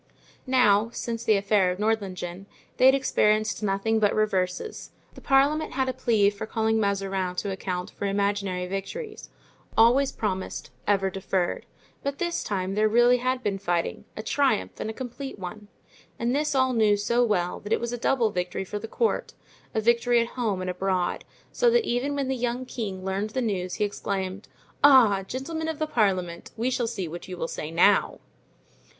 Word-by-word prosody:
Now, 225 Hz, -4 st, +4 dB
since 230 Hz, -1 st, -4 dB
the 215 Hz, -, +4 dB
affair 200 Hz, -1 st, +2 dB
of 180 Hz, -, -2 dB
Nordlingen, 195 Hz, -3 st, -2 dB, 0.3 s
they 255 Hz, -, +6 dB
had 265 Hz, -, +7 dB
experienced 215 Hz, -5 st, +1 dB
nothing 210 Hz, +2 st, +1 dB
but 205 Hz, -2 st, +2 dB
reverses; 195 Hz, -, -1 dB, 0.2 s
the -, -, -13 dB
parliament 285 Hz, +3 st, +2 dB
had 265 Hz, 0 st, 0 dB
a 260 Hz, -, -1 dB
plea 220 Hz, -5 st, +2 dB
for 205 Hz, +2 st, -7 dB
calling 220 Hz, 0 st, +1 dB
Mazarin 195 Hz, -3 st, -1 dB
to 200 Hz, +2 st, -2 dB
account 185 Hz, 0 st, -4 dB
for 200 Hz, -, -4 dB
imaginary 200 Hz, -2 st, -1 dB
victories, 195 Hz, -, -6 dB, 0.5 s
always 250 Hz, +5 st, +5 dB
promised, 190 Hz, -3 st, -4 dB, 0.2 s
ever 195 Hz, -2 st, +2 dB
deferred; 185 Hz, -1 st, -2 dB, 0.3 s
but 280 Hz, 0 st, -3 dB
this 345 Hz, +1 st, -2 dB
time 190 Hz, -2 st, -2 dB
there 215 Hz, +2 st, +3 dB
really 240 Hz, +2 st, +5 dB
had 255 Hz, +1 st, -1 dB
been 200 Hz, -2 st, -1 dB
fighting, 175 Hz, -3 st, -2 dB
a 215 Hz, -, -4 dB
triumph 220 Hz, -, 0 dB
and -, -, -3 dB
a -, -, -4 dB
complete 260 Hz, +2 st, -7 dB
one. 200 Hz, +2 st, -8 dB, 0.5 s
And 240 Hz, +2 st, 0 dB
this 295 Hz, 0 st, 0 dB
all 260 Hz, -1 st, +3 dB
knew 215 Hz, -3 st, +3 dB
so 235 Hz, +4 st, +2 dB
well 180 Hz, -6 st, 0 dB
that 205 Hz, -, -9 dB
it -, -, +3 dB
was 235 Hz, 0 st, -3 dB
a -, -, -2 dB
double 235 Hz, -3 st, +2 dB
victory 180 Hz, +1 st, -3 dB
for 205 Hz, +2 st, -5 dB
the 225 Hz, -, -7 dB
court, 455 Hz, -, -1 dB, 0.4 s
a -, -, +3 dB
victory 235 Hz, +1 st, +3 dB
at 230 Hz, 0 st, 0 dB
home 215 Hz, -7 st, -2 dB
and 185 Hz, -, -3 dB
abroad; 185 Hz, -1 st, -1 dB, 0.3 s
so -, -, +3 dB
that 470 Hz, -1 st, +3 dB
even 260 Hz, +4 st, -1 dB
when 280 Hz, -2 st, -1 dB
the 265 Hz, -, 0 dB
young 245 Hz, +1 st, -2 dB
king 195 Hz, -7 st, -5 dB
learned 195 Hz, +2 st, -1 dB
the 255 Hz, +4 st, -2 dB
news 185 Hz, -5 st, -2 dB
he -, -, -1 dB
exclaimed, 200 Hz, -1 st, -4 dB, 0.4 s
"Ah, 245 Hz, -9 st, +7 dB
gentlemen 295 Hz, -, -4 dB
of 320 Hz, -2 st, -3 dB
the 310 Hz, -, 0 dB
parliament, 185 Hz, -, 0 dB
we 240 Hz, +3 st, 0 dB
shall 245 Hz, -2 st, 0 dB
see 200 Hz, -6 st, -3 dB
what 170 Hz, +2 st, -8 dB
you 180 Hz, -1 st, -7 dB
will 165 Hz, -, -2 dB
say 155 Hz, -, -5 dB
now!" 175 Hz, +5 st, +3 dB
215 Hz, 185 wpm, -26 LUFS, 195-245 Hz, 0.5 s, had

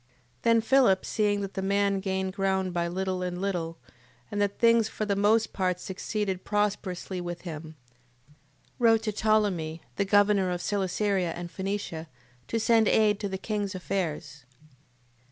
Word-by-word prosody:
8:8. -, -, -38 dB
Then 230 Hz, +4 st, +4 dB
Philip 230 Hz, -5 st, +4 dB
seeing 205 Hz, -1 st, +1 dB
that 195 Hz, -1 st, -5 dB
the 190 Hz, -, -3 dB
man 200 Hz, 0 st, +1 dB
gained 190 Hz, -1 st, -2 dB
ground 190 Hz, -2 st, 0 dB
by 170 Hz, 0 st, 0 dB
little 185 Hz, +1 st, -2 dB
and 180 Hz, -1 st, -3 dB
little, 175 Hz, -4 st, -2 dB, 0.5 s
and 205 Hz, -, -1 dB
that 200 Hz, 0 st, 0 dB
things 230 Hz, -2 st, +4 dB
for 215 Hz, -, -3 dB
the 200 Hz, -1 st, 0 dB
most 215 Hz, +2 st, +2 dB
part 180 Hz, -2 st, 0 dB
succeeded 190 Hz, 0 st, -3 dB
prosperously 195 Hz, -3 st, -2 dB
with 175 Hz, -1 st, -5 dB
him, 160 Hz, -2 st, -7 dB, 1.0 s
wrote 225 Hz, -2 st, +4 dB
to 215 Hz, -, -1 dB
Ptolemee, 200 Hz, -7 st, +1 dB, 0.2 s
the 200 Hz, -, +1 dB
governor 205 Hz, -1 st, +4 dB
of 180 Hz, -1 st, -2 dB
Celesyria 195 Hz, -2 st, 0 dB
and 175 Hz, 0 st, -7 dB
Phenicia, 190 Hz, -4 st, -4 dB, 0.4 s
to 230 Hz, -, -1 dB
send 225 Hz, -1 st, +4 dB
aid 210 Hz, -1 st, +3 dB
to 200 Hz, -, -3 dB
the 190 Hz, -, -3 dB
king's 205 Hz, -1 st, -3 dB
affairs. 160 Hz, -7 st, -3 dB
195 Hz, 155 wpm, -28 LUFS, 180-210 Hz, 1.0 s, Then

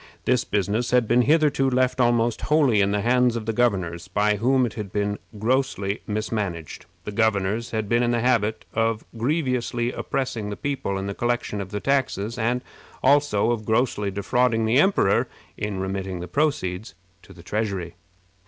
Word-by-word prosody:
This 125 Hz, -2 st, +2 dB
business 105 Hz, +4 st, -1 dB
had 125 Hz, -2 st, +3 dB
been 120 Hz, +2 st, +4 dB
hitherto 145 Hz, -1 st, +3 dB
left 130 Hz, 0 st, +1 dB
almost 120 Hz, -1 st, +2 dB
wholly 140 Hz, -9 st, +3 dB
in 100 Hz, -, +2 dB
the 100 Hz, 0 st, 0 dB
hands 125 Hz, +1 st, +3 dB
of 115 Hz, -2 st, -4 dB
the 115 Hz, -, -1 dB
governors, 95 Hz, -7 st, 0 dB
by 105 Hz, +2 st, +1 dB
whom 130 Hz, +4 st, +3 dB
it 115 Hz, -, -4 dB
had 105 Hz, -4 st, -6 dB
been 105 Hz, 0 st, -1 dB, 0.2 s
grossly 110 Hz, -3 st, 0 dB
mismanaged. 105 Hz, -6 st, -3 dB, 0.2 s
The -, -, -5 dB
governors 110 Hz, +1 st, 0 dB
had 110 Hz, -2 st, -2 dB
been 120 Hz, +3 st, +2 dB
in 120 Hz, -, +1 dB
the 120 Hz, 0 st, +1 dB
habit 110 Hz, -3 st, +1 dB
both 115 Hz, -1 st, 0 dB
of -, -, -34 dB
grievously 125 Hz, -2 st, -1 dB
oppressing 115 Hz, -7 st, -3 dB
the 105 Hz, -, -5 dB
people 135 Hz, -9 st, -2 dB
in 95 Hz, -, -3 dB
the 100 Hz, -, -3 dB
collection 120 Hz, -2 st, -1 dB
of 95 Hz, -, -6 dB
the 105 Hz, +1 st, -3 dB
taxes, 125 Hz, -4 st, -1 dB
and 120 Hz, +2 st, 0 dB, 0.4 s
also 135 Hz, -6 st, +3 dB
of 115 Hz, -2 st, -2 dB
grossly 110 Hz, -2 st, 0 dB
defrauding 115 Hz, +4 st, +1 dB
the 115 Hz, +5 st, +3 dB
emperor 155 Hz, -, +3 dB, 0.3 s
in 105 Hz, -2 st, -3 dB
remitting 95 Hz, -1 st, -3 dB
the 90 Hz, -, -6 dB
proceeds 130 Hz, -, -1 dB, 0.3 s
to -, -, -17 dB
the 85 Hz, -3 st, -14 dB
treasury. 100 Hz, -4 st, -3 dB
115 Hz, 175 wpm, -24 LUFS, 100-125 Hz, 0.4 s, been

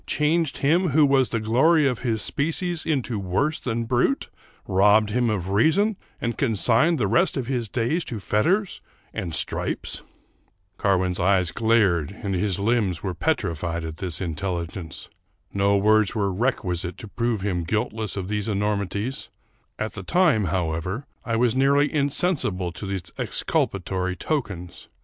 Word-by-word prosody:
— -, -, -37 dB
changed 155 Hz, 0 st, +1 dB
him 170 Hz, +6 st, +2 dB
who 155 Hz, -, +7 dB
was 135 Hz, -2 st, +3 dB
the 115 Hz, -, -1 dB
glory 135 Hz, +9 st, +3 dB
of 125 Hz, -3 st, -1 dB
his 115 Hz, -4 st, -1 dB
species 165 Hz, +3 st, -2 dB
into 130 Hz, -8 st, -1 dB
worse 100 Hz, -, 0 dB
than 115 Hz, -2 st, -2 dB
brute? 125 Hz, -, +1 dB, 0.2 s
— -, -, -32 dB
robbed 105 Hz, +2 st, +4 dB
him 120 Hz, +1 st, +1 dB
of 95 Hz, -4 st, -2 dB
reason 160 Hz, -, +3 dB, 0.2 s
and 120 Hz, 0 st, -3 dB
con 120 Hz, -6 st, +1 dB
signed 125 Hz, -, +3 dB
the 115 Hz, -, +1 dB
rest 155 Hz, -, +2 dB
of 130 Hz, -, -2 dB
his 120 Hz, -4 st, -2 dB
days 130 Hz, -, 0 dB
to 115 Hz, -, -5 dB
fetters 180 Hz, -, 0 dB, 0.3 s
and 85 Hz, -3 st, -2 dB
stripes? -, -, -1 dB, 0.4 s
" -, -, -43 dB
Carwin's 90 Hz, -2 st, +1 dB
eyes 90 Hz, -2 st, +2 dB
glared 105 Hz, -9 st, +2 dB
and 100 Hz, -2 st, -1 dB
his 95 Hz, 0 st, 0 dB
limbs 100 Hz, -4 st, 0 dB
were 95 Hz, -2 st, -2 dB
petrified 85 Hz, 0 st, -1 dB
at 80 Hz, 0 st, -6 dB
this 90 Hz, -5 st, -3 dB
intelligence. 85 Hz, -1 st, -4 dB, 0.5 s
No 100 Hz, 0 st, +3 dB
words 110 Hz, +1 st, +3 dB
were 100 Hz, -3 st, 0 dB
requisite 90 Hz, -6 st, -1 dB
to 110 Hz, -, -9 dB
prove 115 Hz, 0 st, -1 dB
him 90 Hz, -4 st, -1 dB
guilt 105 Hz, +6 st, -1 dB
less 110 Hz, -4 st, -4 dB
of 95 Hz, -2 st, -3 dB
these 105 Hz, 0 st, -2 dB
enormities: 105 Hz, +3 st, -2 dB, 0.5 s
at 110 Hz, -, -3 dB
the 100 Hz, -, -6 dB
time, 150 Hz, -, +3 dB
however, 90 Hz, -, -2 dB, 0.2 s
I 115 Hz, -, -1 dB
was 120 Hz, 0 st, +2 dB
nearly 140 Hz, +2 st, +3 dB
insensible 140 Hz, -, 0 dB
to 100 Hz, +4 st, -7 dB
these 95 Hz, -2 st, -3 dB, 0.2 s
exculpatory 95 Hz, -1 st, -1 dB
tokens. 95 Hz, -, -4 dB
105 Hz, 160 wpm, -24 LUFS, 95-135 Hz, 0.5 s, who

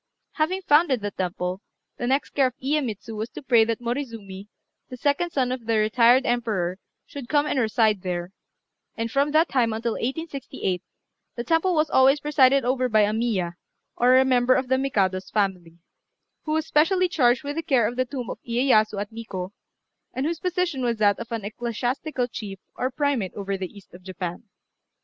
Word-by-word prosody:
Having 365 Hz, +5 st, -1 dB
founded 290 Hz, -6 st, +3 dB
the 205 Hz, 0 st, -3 dB
temple, 180 Hz, 0 st, -3 dB, 0.4 s
the 240 Hz, -, -3 dB
next 270 Hz, +3 st, 0 dB
care 270 Hz, -2 st, +3 dB
of 255 Hz, -, -8 dB
Iyémitsu 245 Hz, -6 st, -2 dB
was 220 Hz, +2 st, -4 dB
to -, -, -10 dB
pray 235 Hz, -4 st, +5 dB
that 230 Hz, -1 st, -2 dB
Morizumi, 230 Hz, -6 st, -5 dB, 0.4 s
the 255 Hz, -, -8 dB
second 285 Hz, +7 st, 0 dB
son 265 Hz, -6 st, 0 dB
of 250 Hz, -3 st, -5 dB
the 225 Hz, -1 st, +2 dB
retired 235 Hz, +4 st, +4 dB
emperor, 215 Hz, -7 st, -1 dB, 0.3 s
should 275 Hz, -4 st, -9 dB
come 295 Hz, -1 st, +3 dB
and 290 Hz, -, 0 dB
reside 220 Hz, -3 st, +2 dB
there; 180 Hz, -1 st, -4 dB, 0.6 s
and 230 Hz, 0 st, -3 dB
from 280 Hz, +2 st, +2 dB
that 315 Hz, +3 st, +3 dB
time 235 Hz, -4 st, +1 dB
until 230 Hz, +1 st, -2 dB
1868, 265 Hz, -, -3 dB, 0.5 s
the 235 Hz, -, -3 dB
temple 330 Hz, +6 st, +2 dB
was 305 Hz, -1 st, +1 dB
always 270 Hz, +2 st, +5 dB
presided 275 Hz, -3 st, +3 dB
over 255 Hz, 0 st, +1 dB
by 215 Hz, -1 st, +4 dB
a 210 Hz, 0 st, +2 dB
Miya, 200 Hz, -7 st, -1 dB, 0.4 s
or 255 Hz, +2 st, +5 dB
member 255 Hz, -1 st, +3 dB
of 260 Hz, -1 st, -1 dB
the 260 Hz, 0 st, +3 dB
Mikado's 190 Hz, -8 st, 0 dB
family, 185 Hz, -5 st, -2 dB, 0.7 s
who 310 Hz, -, -1 dB
was 315 Hz, 0 st, 0 dB
specially 365 Hz, +5 st, +3 dB
charged 260 Hz, -5 st, +2 dB
with 285 Hz, +1 st, -4 dB
the 330 Hz, -, -1 dB
care 255 Hz, -8 st, +2 dB
of 240 Hz, -, -4 dB
the 255 Hz, -, +1 dB
tomb 250 Hz, -2 st, -5 dB
of -, -, -8 dB
Iyéyasu 230 Hz, -4 st, +2 dB
at 205 Hz, +1 st, -4 dB
Nikkô, 200 Hz, -5 st, -6 dB, 0.6 s
and 260 Hz, -, -1 dB
whose 330 Hz, +1 st, -2 dB
position 360 Hz, -6 st, -1 dB
was 235 Hz, -2 st, 0 dB
that 205 Hz, -1 st, +3 dB
of 235 Hz, 0 st, -8 dB
an 225 Hz, -3 st, -3 dB
ecclesiastical 245 Hz, +5 st, -2 dB
chief 205 Hz, -5 st, -7 dB, 0.2 s
or 255 Hz, -, -1 dB
primate 270 Hz, -8 st, -1 dB
over 200 Hz, -1 st, -3 dB
the 190 Hz, -2 st, -5 dB
east 200 Hz, -3 st, -16 dB
of 175 Hz, -, -12 dB
Japan. 180 Hz, +1 st, -6 dB
240 Hz, 185 wpm, -24 LUFS, 210-275 Hz, 0.7 s, pray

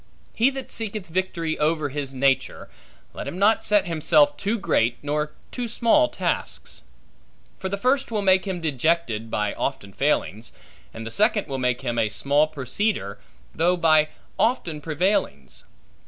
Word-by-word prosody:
He 235 Hz, +4 st, +3 dB
that 270 Hz, -1 st, -6 dB
seeketh 215 Hz, -3 st, -3 dB
victory 170 Hz, -2 st, -2 dB
over 155 Hz, -1 st, +1 dB
his 140 Hz, -1 st, -4 dB
nature, 135 Hz, 0 st, 0 dB, 0.4 s
let -, -, -6 dB
him 175 Hz, -, -5 dB
not 210 Hz, +3 st, +3 dB
set 205 Hz, -2 st, +3 dB
himself 150 Hz, -3 st, +3 dB
too 205 Hz, +9 st, -1 dB
great, 120 Hz, -, +1 dB
nor 150 Hz, +1 st, -2 dB, 0.2 s
too 245 Hz, -1 st, -3 dB
small 240 Hz, +7 st, +3 dB
tasks; -, -, -3 dB, 0.8 s
for 190 Hz, -, -3 dB
the 200 Hz, -, -2 dB
first 260 Hz, +6 st, +1 dB
will 215 Hz, -3 st, -1 dB
make 190 Hz, 0 st, +4 dB
him 185 Hz, -3 st, -3 dB
dejected 150 Hz, -6 st, 0 dB
by 105 Hz, -1 st, -1 dB
often 100 Hz, -1 st, -4 dB
failings; 115 Hz, -5 st, -1 dB, 0.4 s
and 115 Hz, 0 st, -8 dB
the 115 Hz, -, -6 dB
second 215 Hz, -, +2 dB
will 135 Hz, -3 st, -4 dB
make 125 Hz, -1 st, 0 dB
him 120 Hz, -3 st, -2 dB
a 110 Hz, -2 st, +2 dB
small 145 Hz, +7 st, +2 dB
proceeder, 145 Hz, -, -2 dB, 0.3 s
though 175 Hz, +3 st, +2 dB
by 155 Hz, -2 st, +4 dB, 0.3 s
often 175 Hz, -11 st, 0 dB
prevailings. 175 Hz, +7 st, -1 dB
160 Hz, 155 wpm, -24 LUFS, 135-200 Hz, 0.8 s, make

